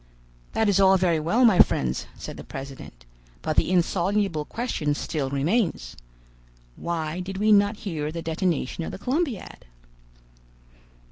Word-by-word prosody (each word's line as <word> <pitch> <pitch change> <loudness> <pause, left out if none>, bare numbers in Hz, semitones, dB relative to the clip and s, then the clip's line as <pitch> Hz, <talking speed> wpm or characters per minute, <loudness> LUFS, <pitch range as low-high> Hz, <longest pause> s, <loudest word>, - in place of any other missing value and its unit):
"That 220 - +2
is 200 -1 +3
all 190 0 +6
very 175 -3 +2
well, 210 +11 +3
my 215 -6 +5
friends," 65 0 +3
said - - -7
the - - -9
president, 135 - -9 0.4
"but 155 - -1
the - - +2
insoluble 185 -1 +1
question 155 -11 -2
still 145 -2 -2
remains. 140 - 0 0.8
Why 165 0 -3
did 190 +1 -5
we 215 +2 +3
not 205 +1 +4
hear 155 -5 -3
the 165 0 -5
detonation 165 -2 -1
of - - -4
the - - -7
Columbiad?" 260 - -3
175 Hz, 140 wpm, -25 LUFS, 150-205 Hz, 0.8 s, all